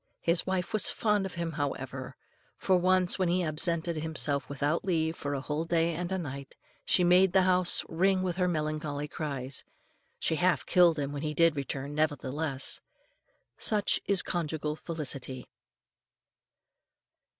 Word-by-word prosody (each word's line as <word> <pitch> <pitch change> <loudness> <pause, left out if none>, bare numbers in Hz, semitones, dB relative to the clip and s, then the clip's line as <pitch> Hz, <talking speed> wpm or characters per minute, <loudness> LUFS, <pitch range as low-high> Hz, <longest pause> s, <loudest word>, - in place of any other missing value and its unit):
His 170 +2 +2
wife 185 -1 -2
was 215 - +6
fond 210 -3 +1
of 185 - -10
him, 170 -1 -3
however, 135 -3 -4 0.4
for, 190 - +2
once, 185 +1 +3
when 185 -2 +1
he 180 +1 +1
absented 165 +1 -1
himself 155 -2 -2
without 145 +3 -1
leave 160 -3 0
for 145 -1 -4
a 135 - -3
whole 150 +3 -2
day 165 0 +1
and 175 +3 -4
a 190 - 0
night, 140 -5 -7 0.3
she 180 - +3
made 180 +1 +5
the 190 - +5
house 180 -1 +4
ring 185 +3 +1
with 180 -2 -2
her 180 -1 +2
melancholy 155 -3 -2
cries. 140 -4 -4 0.5
She 160 - 0
half 180 +1 +1
killed 175 -3 +4
him 140 -1 -2
when 145 -1 -5
he 150 -1 -3
did 165 -2 +4
return, 140 0 -4
nevertheless. 145 -2 -2 0.8
Such 210 -2 +2
is 200 -2 +4
conjugal 155 -3 -3
felicity. 140 -6 -6
160 Hz, 150 wpm, -29 LUFS, 145-180 Hz, 0.8 s, was